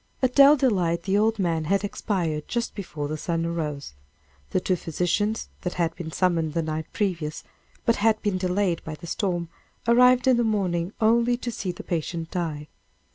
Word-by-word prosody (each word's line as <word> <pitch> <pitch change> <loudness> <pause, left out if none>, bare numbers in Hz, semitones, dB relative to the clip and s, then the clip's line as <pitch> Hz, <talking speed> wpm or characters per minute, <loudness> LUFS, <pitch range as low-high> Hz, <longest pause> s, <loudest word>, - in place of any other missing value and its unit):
At 255 -1 +3
Dell 280 +2 +8
Delight 180 -10 +1
the 190 +2 0
old 220 +2 +3
man 165 -5 0
had 195 +4 +1
expired 170 -7 -2
just 235 -1 -2
before 155 -7 -5
the 155 +1 -3
sun 165 0 -1
arose. 150 - -3 0.6
The - - +1
two 185 0 0
physicians 180 +6 -1
that 180 - -3
had 165 -2 0
been 160 -2 -6
summoned 165 -3 +1
the 165 - +1
night 155 0 -3
previous, 170 -7 -2 0.4
but 230 - +3
had 215 +1 +3
been 200 -3 0
delayed 185 -1 0
by 155 - -6
the 160 +3 -11
storm, 175 -2 -2 0.4
arrived 250 +1 +5
in 255 -2 +5
the 240 - +2
morning 185 -5 0
only 235 +2 +3
to 245 -1 -4
see 195 -4 -3
the 175 - -9
patient 165 -1 -3
die. 155 -4 -3
180 Hz, 185 wpm, -25 LUFS, 165-215 Hz, 0.6 s, Dell